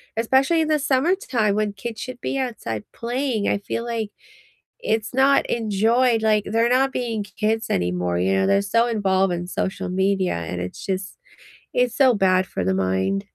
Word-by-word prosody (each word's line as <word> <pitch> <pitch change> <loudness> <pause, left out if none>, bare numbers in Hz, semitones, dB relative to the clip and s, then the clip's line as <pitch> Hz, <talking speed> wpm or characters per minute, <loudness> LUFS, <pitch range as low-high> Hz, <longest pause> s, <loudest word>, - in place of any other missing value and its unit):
Especially 265 +8 +2
in 315 - 0
the 305 -1 +2
summertime 265 - +1
when 210 -1 0
kids 225 +3 -7
should 255 -1 -7
be 275 - -2
outside 220 - -3
playing, 240 -2 -2
I - - +1
feel 200 +3 -4
like 225 -3 -3 0.7
it's 225 - -1
not 270 +2 +4
enjoyed, 225 +2 +2
like, 215 -1 +2
they're 230 +3 +1
not 265 +2 +3
being 230 -5 -2
k 205 - -16
kids 220 +1 0
anymore, 90 0 0
you 95 +2 +1
know, 95 0 +2
they're 100 0 +3
so 230 - +2
involved 195 -4 +1
in 175 0 -4
social 190 0 -3
media 190 0 +1
and 85 +1 -4
it's 90 0 -7
just 190 0 -3 0.6
it's 245 -1 +1
so 260 -3 +5
bad 190 -3 +2
for 95 - -3
the 95 +1 +1
mind. 95 +1 0
215 Hz, 180 wpm, -22 LUFS, 185-245 Hz, 0.7 s, so